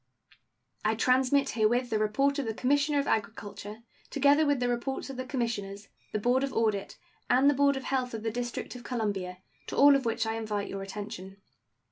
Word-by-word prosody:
I 215 +1 +2
transmit 260 +4 +3
herewith 240 +3 +1
the 215 - +1
report 275 +7 +1
of 270 - -2
the 220 - -2
Commissioner 285 +4 +2
of 280 - +1
Agriculture, 210 +1 -3 0.3
together 285 +2 +4
with 285 -2 +2
the 245 - 0
reports 245 +3 -2
of - - -8
the 255 - -4
Commissioners, 210 -6 -3 0.2
the - - -1
board 245 +5 +2
of 275 - -1
audit, 215 -3 0 0.3
and 255 +3 +5
the 290 - +6
board 280 0 +3
of 265 - -5
health 255 -3 -1
of 220 - -6
the 225 - -1
District 240 +2 -4
of 245 - -9
Columbia, 200 -7 -3 0.3
to - - -5
all 285 0 +8
of 270 -2 0
which 225 0 0
I 220 - -1
invite 210 -2 -3
your 195 - -5
attention. 195 -1 -7
240 Hz, 195 wpm, -29 LUFS, 215-270 Hz, 0.3 s, all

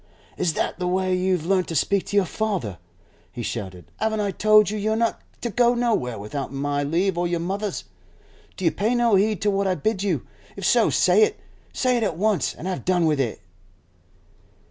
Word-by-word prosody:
'Is 175 -3 0
that - - -2
the 180 - -1
way 185 +1 +1
you've 180 -3 0
learnt 185 0 +1
to 165 - -4
speak 195 +6 +1
to - - -4
your 200 -2 +4
father?' 180 - -3 0.5
he 120 - -6
shouted. 95 -8 -6
'Haven't 220 0 0
I 205 -1 0
told 215 +1 +4
you 215 - -3
you're 215 +2 0
not 230 0 0 0.2
to 235 - -3
go 240 +3 +3
nowhere 225 - 0
without 120 +8 -5
my 145 +1 -1
leave 170 +5 0
or 175 - +1
your 170 -1 -1
mother's? 195 +4 -3 0.7
Do 190 - -4
you 165 - +4
pay 210 +9 0
no 240 -2 +2
heed 205 0 +2
to 205 - +3
what 195 0 0
I 185 - +1
bid 195 +5 -1
you? 200 - -1 0.3
If - - -5
so, - - +4
say - - +4
it! 430 0 +2 0.3
Say 255 -2 +1
it - - -1
at 200 - -1
once, 200 -6 +1
and - - -9
have 185 -1 -3
done 180 -2 +2
with 150 -3 +1
it. 120 -5 -2
190 Hz, 210 wpm, -23 LUFS, 165-215 Hz, 0.7 s, your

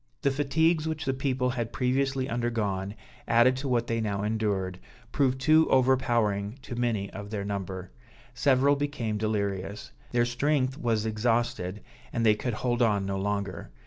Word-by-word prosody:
The 140 - +3
fatigues 155 +3 +2
which 160 -1 -3
the 135 - +1
people 130 -1 0
had 120 -2 -3
previously 135 +1 0
undergone, 110 -5 -2 0.3
added 120 +2 +5
to 140 +1 -4
what 120 -2 +1
they 115 -1 -1
now 100 -2 -1
endured, 100 -4 -1 0.3
proved 130 -2 +1
too 155 +3 +4
overpowering 120 -5 +2
to 125 - -6
many 115 -5 -1
of 100 +1 -7
their 100 -2 -3
number; 95 -2 -4 0.4
several 135 +2 +3
became 140 -7 -2
delirious; 100 -2 -2 0.2
their 120 -1 +3
strength 130 +2 +1
was 115 -6 0
exhausted, 110 -3 -1 0.3
and 115 -1 0
they 110 - +6
could 115 +2 -3
hold 120 +1 -1
on 105 -4 +2
no 95 0 -2
longer. 100 -5 -3
120 Hz, 155 wpm, -28 LUFS, 105-130 Hz, 0.4 s, they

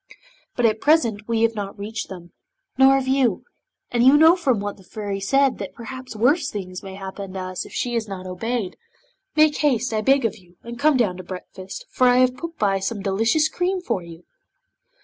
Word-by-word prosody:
But 245 - +1
at 220 -1 +2
present 235 -9 +2
we 230 -1 +1
have 230 0 +3
not 205 -1 -5
reached 215 +3 -5
them, 175 -2 -10 0.4
nor 265 +1 +6
have 270 -1 -1
you, 260 -6 +1 0.5
and 240 -1 +2
you 265 +3 +7
know 320 +3 +7
from 265 - +1
what 205 0 -4
the 190 - -17
Fairy 200 +1 -5
said 270 +7 +2
that - - -6
perhaps 255 0 -8
worse 270 +7 +2
things 185 -5 -6
may 190 -1 -9
happen 195 0 -7
to 190 - -4
us 185 -1 -5
if - - -16
she 245 - -2
is 230 -2 -1
not 190 -2 -7
obeyed. 195 +3 -3 0.6
Make 310 -1 +4
haste, 250 -5 +1
I 215 - 0
beg 270 +3 +3
of 225 - -2
you, 175 -1 -23
and 235 +1 -8
come 295 0 +4
down 205 -7 +1
to 185 - -8
breakfast, 185 +1 -9
for 255 - +3
I 245 0 +5
have 255 0 +3
put 335 +4 -7
by 195 -2 +1
some 195 +1 -3
delicious 225 +11 +2
cream 365 +3 -1
for 235 - -2
you." 170 0 -12
225 Hz, 210 wpm, -22 LUFS, 195-265 Hz, 0.6 s, you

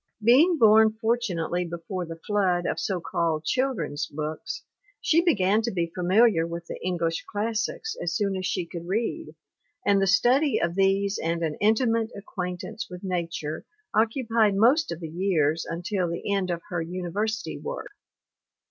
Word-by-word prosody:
Being 295 +10 +6
born 220 -2 +6
fortunately 190 -7 0
before 175 +1 -5
the 165 0 -8
flood 185 -4 +1
of - - -1
so 190 -3 -1
called 165 -2 -1
children's 205 - -1
books, 155 - -5 0.4
she 325 +1 +3
began 215 - +3
to 230 - -1
be 170 -3 -2
familiar 185 -1 +3
with 170 0 -6
the - - -8
English 170 -2 -1
classics 230 - -2
as 170 -1 -2
soon 200 0 0
as 185 -1 -2
she 180 -3 -1
could 170 0 -8
read, 230 - -2 0.5
and 200 -1 +4
the 195 - +2
study 255 +9 +3
of 170 0 0
these 195 +1 +2
and 165 +1 -1
an 155 -2 0
intimate 225 +1 +2
acquaintance 185 +3 -5
with 180 0 -9
nature 170 -4 -3 0.3
occu 230 +3 +1
pied 220 -3 +3
most 255 - +4
of 170 0 -5
the 165 - -4
years 165 -2 0
until 175 +2 -2
the 170 +4 -2
end 195 -2 0
of 170 -1 -3
her 175 -3 -2
university 185 +6 -3
work. - - -6
190 Hz, 160 wpm, -26 LUFS, 170-225 Hz, 0.5 s, Being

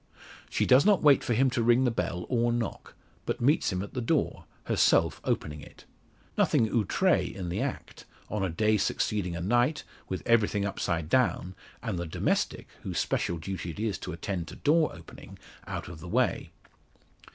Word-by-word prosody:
She - - 0
does 130 +2 +6
not 205 -2 +4
wait 145 -3 +6
for 120 - 0
him 130 +2 +3
to 120 - 0
ring 120 +2 +4
the 125 - +2
bell, 90 -5 -2
or 120 -1 +1
knock; 120 -1 -4 0.3
but - - -1
meets 140 +2 +2
him 90 0 -2
at 100 - -9
the 125 - -2
door, 115 - 0 0.2
herself - - +2
opening 75 -1 -2
it. - - -15 0.5
Nothing 110 - +3
outre 110 -5 +2
in 90 -3 -4
the 85 - -2
act, - - -5 0.2
on 105 -2 -2
a 95 - 0
day 105 +6 +2
succeeding 95 -3 -1
a 85 - -4
night, 120 - +1 0.3
with 95 - -4
everything 105 -3 +2
upside 85 -5 -2
down, 95 -3 +1 0.3
and 110 -7 -2
the 85 - -4
domestic, 80 - -1
whose - - -5
special 85 - 0
duty 90 +1 -5
it 85 - -7
is 110 -3 -1
to - - -6
attend 85 0 -4
to - - -9
door 155 +1 +3
opening, 80 0 -12 0.3
out - - -5
of 85 -3 -9
the 85 +2 -9
way. - - +1
105 Hz, 185 wpm, -28 LUFS, 90-120 Hz, 0.5 s, does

